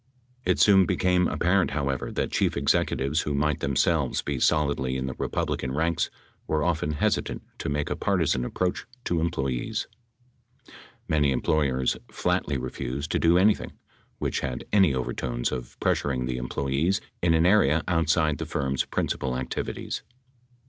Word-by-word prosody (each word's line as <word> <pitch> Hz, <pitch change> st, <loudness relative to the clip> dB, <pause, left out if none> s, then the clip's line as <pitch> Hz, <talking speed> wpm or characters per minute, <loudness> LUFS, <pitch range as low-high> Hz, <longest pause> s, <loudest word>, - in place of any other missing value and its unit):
It -, -, +2 dB
soon 95 Hz, -3 st, +6 dB
became 90 Hz, 0 st, +2 dB
apparent, 90 Hz, +2 st, +2 dB
however, 70 Hz, -3 st, -2 dB
that -, -, -1 dB
chief -, -, +1 dB
executives 70 Hz, +1 st, +1 dB
who 75 Hz, -, -2 dB
might 75 Hz, 0 st, +1 dB
themselves 70 Hz, -2 st, +1 dB
be 70 Hz, -2 st, -2 dB
solidly 70 Hz, -3 st, +1 dB
in 65 Hz, -, -2 dB
the 65 Hz, -, -3 dB
Republican 65 Hz, -1 st, -2 dB
ranks 80 Hz, +3 st, 0 dB, 0.4 s
were 75 Hz, -1 st, +1 dB
often 80 Hz, -3 st, 0 dB
hesitant 75 Hz, -, -1 dB, 0.2 s
to -, -, -3 dB
make 70 Hz, 0 st, -1 dB
a -, -, 0 dB
partisan 80 Hz, -10 st, +1 dB
approach 90 Hz, +8 st, -2 dB, 0.2 s
to 85 Hz, -, 0 dB
employees. 65 Hz, -7 st, -1 dB, 1.2 s
Many 75 Hz, -2 st, +2 dB
employers 65 Hz, -1 st, +1 dB
flatly 90 Hz, -5 st, 0 dB
refused 65 Hz, +3 st, -4 dB
to -, -, +1 dB
do 85 Hz, +1 st, +4 dB
anything 100 Hz, +3 st, +2 dB, 0.4 s
which -, -, -1 dB
had 65 Hz, -1 st, -4 dB
any 95 Hz, -9 st, +5 dB
overtones -, -, -2 dB
of 60 Hz, -2 st, -6 dB
pressuring 65 Hz, -3 st, 0 dB
the 65 Hz, 0 st, -2 dB
employees 70 Hz, +8 st, 0 dB, 0.2 s
in 85 Hz, -1 st, +3 dB
an 80 Hz, +1 st, +3 dB
area 80 Hz, -6 st, +4 dB
outside 80 Hz, -3 st, +2 dB
the -, -, -4 dB
firm's 65 Hz, 0 st, -1 dB
principal 65 Hz, -2 st, -2 dB
activities. 65 Hz, -1 st, -4 dB
75 Hz, 145 wpm, -26 LUFS, 65-85 Hz, 1.2 s, soon